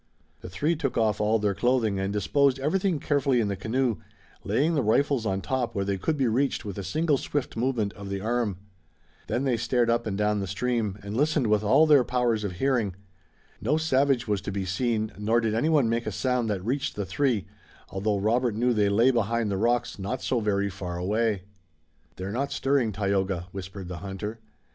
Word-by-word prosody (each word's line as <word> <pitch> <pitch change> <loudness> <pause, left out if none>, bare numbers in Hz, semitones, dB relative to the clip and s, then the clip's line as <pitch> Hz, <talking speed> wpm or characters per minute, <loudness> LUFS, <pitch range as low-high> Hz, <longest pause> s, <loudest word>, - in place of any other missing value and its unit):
The - - -9
three 150 - 0
took 145 -4 -2
off 110 -2 +1
all 110 +2 +3
their 105 -2 0
clothing 110 -1 +1
and 95 +1 -1
disposed 135 +7 +2
everything 170 +5 0
carefully 140 -3 +1
in 105 -3 +1
the 100 - -1
canoe, 115 +3 0 0.5
laying 135 +11 +1
the 145 - +2
rifles 125 +1 +2
on 95 0 -1
top 125 -1 -2
where 100 -1 0
they 100 -1 -1
could 155 - -1
be 135 - +2
reached 125 +1 0
with 100 -1 -5
a - - -4
single 155 - +1
swift 145 -3 -3
movement 115 -4 0
of 100 -2 -9
the 100 0 -2
arm. 110 -2 -1 0.7
Then 125 - -1
they 130 -4 +1
stared 115 +1 +1
up 120 -1 0
and 100 -2 -2
down 105 0 +1
the 100 - -3
stream, 105 0 -1
and 100 +1 -5
listened 150 +1 +2
with 105 -1 +2
all 110 +9 +5
their 145 -4 +6
powers 120 -3 0
of 100 -3 -3
hearing. 115 -2 0 0.7
No 140 +9 +1
savage 135 -5 +2
was 105 -3 0
to 100 - -4
be 95 -1 -3
seen 110 +3 -1
nor 110 +3 +2
did 110 -2 0
anyone 145 +2 +3
make 115 +1 -1
a - - -1
sound 125 -3 0
that 100 -3 -2
reached 135 +4 -1
the 100 - -3
three, 115 +1 0 0.5
although 100 +2 0
Robert 115 +3 +1
knew 120 +2 +2
they 105 -2 +2
lay 115 +6 +4
behind 115 -2 0
the - - 0
rocks 120 +1 0
not 115 +7 -3
so 125 - +1
very 100 -2 0
far 90 -2 -5
away. 105 +2 0 0.7
"They're 95 +2 -5
not 135 +6 -2
stirring, 135 -5 +1
Tayoga," 95 -2 -1
whispered 95 0 -7
the 90 -1 -6
hunter. 100 +4 -6
115 Hz, 205 wpm, -26 LUFS, 100-130 Hz, 0.7 s, their